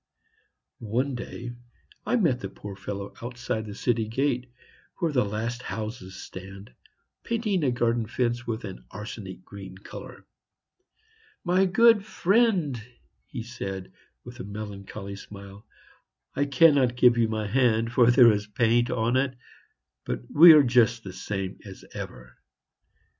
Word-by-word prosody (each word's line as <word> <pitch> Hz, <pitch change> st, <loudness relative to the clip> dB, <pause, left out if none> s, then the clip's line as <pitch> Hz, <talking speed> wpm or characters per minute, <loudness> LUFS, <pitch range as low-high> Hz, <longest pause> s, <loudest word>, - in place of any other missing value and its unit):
One 125 Hz, +5 st, -1 dB
day 120 Hz, 0 st, -6 dB, 0.6 s
I -, -, +2 dB
met 165 Hz, -, +2 dB
the 95 Hz, -, -5 dB
poor 100 Hz, 0 st, -9 dB
fellow 100 Hz, 0 st, -6 dB
outside 120 Hz, -2 st, -4 dB
the 100 Hz, -, -7 dB
city 115 Hz, -1 st, 0 dB
gate, 125 Hz, +1 st, -1 dB, 0.5 s
where 170 Hz, -4 st, 0 dB
the 125 Hz, -4 st, +2 dB
last 110 Hz, +4 st, -3 dB
houses 110 Hz, -5 st, -6 dB
stand, 95 Hz, -3 st, -10 dB, 0.5 s
painting 215 Hz, -7 st, -1 dB
a 135 Hz, -, +3 dB
garden 120 Hz, -2 st, 0 dB
fence 120 Hz, +1 st, -1 dB
with 115 Hz, 0 st, -3 dB
an 95 Hz, -, -8 dB
arsenic 100 Hz, -3 st, -8 dB
green 95 Hz, -2 st, -10 dB
color. 95 Hz, -, -11 dB, 1.2 s
"My 185 Hz, +2 st, +3 dB
good 225 Hz, +2 st, +5 dB
friend," 195 Hz, -, +1 dB, 0.5 s
he 120 Hz, -4 st, -6 dB
said, 95 Hz, -5 st, -6 dB, 0.3 s
with 120 Hz, 0 st, -11 dB
a -, -, -5 dB
melancholy 100 Hz, -1 st, -7 dB
smile, 100 Hz, 0 st, -12 dB, 0.7 s
"I 145 Hz, -, +1 dB
cannot 140 Hz, -4 st, +4 dB
give 125 Hz, -1 st, +6 dB
you 115 Hz, -1 st, +2 dB
my 110 Hz, -1 st, -2 dB
hand, 115 Hz, 0 st, +2 dB
for 120 Hz, -1 st, +5 dB
there 120 Hz, -1 st, +7 dB
is 105 Hz, 0 st, -2 dB
paint 120 Hz, +3 st, +2 dB
on 115 Hz, +1 st, 0 dB
it; 130 Hz, -1 st, 0 dB, 0.7 s
but -, -, -3 dB
we 165 Hz, +2 st, +10 dB
are 150 Hz, -2 st, +7 dB
just 120 Hz, -2 st, +3 dB
the 95 Hz, -, -8 dB
same 95 Hz, -1 st, -4 dB
as 95 Hz, -3 st, -11 dB
ever." -, -, -9 dB
115 Hz, 140 wpm, -26 LUFS, 100-130 Hz, 1.2 s, we